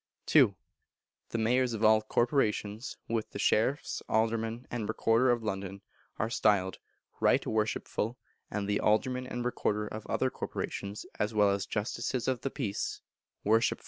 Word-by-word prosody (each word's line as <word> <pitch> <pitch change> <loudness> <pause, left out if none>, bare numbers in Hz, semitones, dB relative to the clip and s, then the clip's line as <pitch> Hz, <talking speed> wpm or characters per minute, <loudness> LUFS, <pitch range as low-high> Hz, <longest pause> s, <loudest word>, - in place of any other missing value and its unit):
ii. - - +7 0.7
The - - -2
Mayors 120 +2 +2
of 110 0 -3
all 110 0 +6
Corporations, 110 -1 0
with 115 -1 -1
the - - -7
Sheriffs, 130 +7 +1
Aldermen, 115 +2 0
and 115 -3 -3
Recorder 115 +3 +3
of 120 -2 +2
London, 100 -2 -4 0.3
are 110 - 0
styled 100 -4 +2 0.4
Right - - +3
Worshipful; 110 +1 -1 0.3
and 105 -1 -2
the 105 0 +1
Aldermen 125 +4 +1
and 120 -1 -4
Recorder 105 -3 0
of 110 0 -7
other - - +1
Corporations, 100 +1 -4
as 105 +1 0
well 105 -1 +5
as 100 -1 -1
Justices 120 +3 -2
of 130 -2 0
the 135 - -1
Peace, 110 -8 -3 0.4
Worshipful. 110 +2 +3
110 Hz, 145 wpm, -31 LUFS, 105-120 Hz, 0.7 s, ii